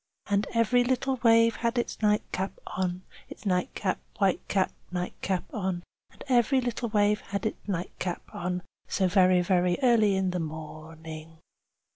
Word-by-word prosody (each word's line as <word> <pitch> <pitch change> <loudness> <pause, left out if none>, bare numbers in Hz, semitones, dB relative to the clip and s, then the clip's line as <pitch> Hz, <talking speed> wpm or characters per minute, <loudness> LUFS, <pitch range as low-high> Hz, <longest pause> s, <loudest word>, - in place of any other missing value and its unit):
Chorus 205 - -4
And 200 - +1
every 235 +2 +4
little 260 +1 0
wave 230 -1 +5
had 235 +1 -1
its 240 - -2
nightcap 210 -2 0
on, 185 -1 -2 0.3
Its - - -11
nightcap, 185 0 0 0.2
white 195 -3 +2
cap, 190 -2 +1 0.2
nightcap 180 +1 -2
on. 185 -4 -2 0.3
And - - -13
every 255 +1 +4
little 245 -1 -2
wave 210 0 +2
had 200 +2 -4
its 215 - -4
nightcap 180 -1 -3
on, 180 0 -3 0.2
So 190 - +1
very, 185 -1 +5
very 180 0 +2
early 220 -5 +5
in 190 -1 +1
the 180 - -2
morning. 160 0 -8
190 Hz, 150 wpm, -28 LUFS, 180-225 Hz, 0.3 s, wave